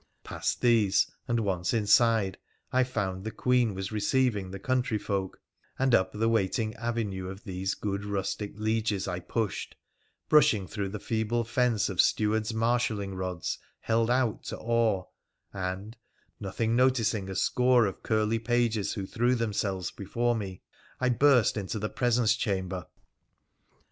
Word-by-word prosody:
Past - - -3
these, 110 -5 +4 0.2
and 120 -1 +1
once 95 +2 -1
inside, 110 -2 +3 0.3
I 130 0 +4
found 95 -7 -3
the 110 - -3
Queen 120 -1 +1
was 95 +1 -4
receiving 110 -2 +1
the 95 - -6
country 125 +1 0
folk, 95 -2 -3 0.4
and 135 -1 +2
up 95 - +4
tho 110 +2 0
waiting 110 0 +1
avenue 110 -5 -3
of 95 +2 -9
these 95 0 -3
good 100 -1 -3
rustic 100 0 -3
lieges 110 -2 -1
I 90 -1 -2
pushed, 110 +3 -3 0.5
brushing 145 -10 +4
through 100 +1 -4
the 105 +2 -5
feeble 115 +2 -1
fence 115 -2 +1
of 95 -3 +3
stewards' 110 +1 +1
marshalling 110 -3 0
rods 95 -2 -3 0.2
held 115 0 +1
out 125 -3 +1
to - - -5
awe, 115 -4 +1 0.5
and, 95 +3 -4 0.4
nothing 110 +4 -1
noticing 115 -6 +2
a 95 - -5
score 125 +4 +3
of 95 - -4
curly 110 0 +1
pages 115 -3 0
who 100 -4 -4
threw 120 +5 +1
themselves 100 -5 -2
before 120 +4 -1
me, 95 -4 -6 0.4
I 130 - +2
burst 125 -2 +4
into 100 +1 -3
the 105 0 -2
presence 120 -3 +2
chamber. 95 -4 -2
110 Hz, 145 wpm, -28 LUFS, 95-120 Hz, 0.5 s, these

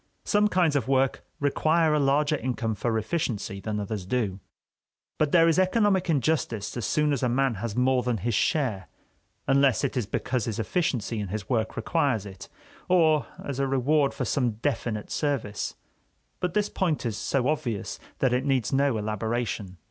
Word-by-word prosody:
Some 210 0 +3
kinds 180 -7 +2
of 130 -5 0
work 135 0 +1 0.2
require 155 +3 +2
a 150 - +3
larger 145 +2 +2
income 125 -5 -2
for 110 +2 -1
efficiency 110 -5 -2
than 105 +1 -3
others 105 -1 -4
do; 100 -2 -1 0.8
but 150 -2 +2
there 165 -1 +6
is 165 +2 +3
economic 190 -1 +2
injustice 125 -8 0
as 120 -4 -2
soon 150 -1 +2
as 135 - -1
a 125 - +1
man 135 +1 +2
has 115 -3 -3
more 125 0 +3
than 125 -2 -1
his 115 +4 -2
share, 110 -3 0 0.6
unless 135 -3 +3
it - - -1
is 120 -6 -1
because 125 +1 -1
his 110 -3 -3
efficiency 120 - -1
in 105 - -3
his 100 +3 -5
work 110 -3 0
requires 140 - 0
it, 95 -2 -10 0.4
or 160 -5 +4 0.2
as 140 -2 -4
a 135 - +1
reward 135 +2 +2
for - - -3
some 125 -5 0
definite 110 -2 -3
service. 140 -9 -2 0.6
But 180 -1 -2
this 210 -1 +2
point 165 -8 -1
is 115 -3 -1
so 130 +3 0
obvious 120 -9 -2 0.2
that 130 -2 +2
it 125 +1 +1
needs 135 -4 0
no 135 -3 +2
elaboration. 110 -2 -3
130 Hz, 175 wpm, -26 LUFS, 110-150 Hz, 0.8 s, there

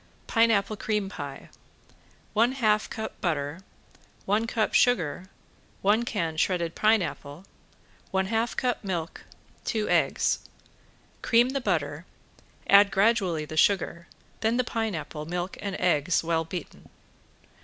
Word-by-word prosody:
~PINEAPPLE 220 -3 +2
CREAM 210 -2 -1
PIE~ 140 -7 -8 0.8
One 235 +4 +3
half 215 -5 +1
cup 220 - -6
butter, 150 -2 -1 0.7
one 210 +3 +1
cup 225 -2 0
sugar, 185 -7 +2 0.6
one 215 +4 +3
can 165 -9 -2
shredded 170 -1 0
pineapple, 190 -7 0 0.6
one 190 0 0
half 225 +4 -1
cup 250 -3 -1
milk, 175 -4 -4 0.4
two 215 -2 -1
eggs. - - +2 0.8
Cream 240 +1 +4
the 275 +1 -2
butter, 160 -6 -2 0.6
add 200 +1 +7
gradually 195 -6 +2
the 155 - -8
sugar, 170 -2 +2 0.3
then 225 +2 +1
the 250 - +2
pineapple, 180 -10 -4
milk 175 +2 -3
and 200 -2 -3
eggs 170 -2 +2
well 165 0 0
beaten. 170 0 -8
195 Hz, 120 wpm, -27 LUFS, 165-225 Hz, 0.8 s, add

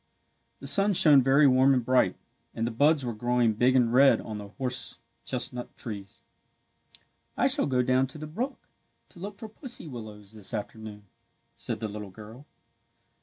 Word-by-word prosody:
The - - -9
sun 200 +1 +4
shone 150 -6 +6
very 135 +3 +4
warm 130 0 +5
and 125 -2 -1
bright, 130 +1 +2 0.4
and 115 - -1
the 120 - -2
buds 145 +4 +3
were 120 - -3
growing 120 0 +1
big 125 +4 +2
and 120 -2 +3
red 135 +2 +6
on 110 -2 -6
the 100 - -8
horse 125 +4 -4 0.3
chestnut 125 -1 -3
trees. 100 -4 -9 1.1
"I - - +2
shall - - +2
go 125 -2 +1
down 130 +1 +2
to 135 - -9
the 155 - -7
brook 240 - -5 0.4
to 175 - -16
look 200 +2 -7
for 220 - -8
pussy 235 - -5
willows 110 -5 -9
this 110 +1 -6
afternoon," 105 0 -7 0.5
said - - -4
the 110 - -2
little 105 -1 -7
girl. 110 +8 -13
125 Hz, 170 wpm, -27 LUFS, 110-140 Hz, 1.1 s, shone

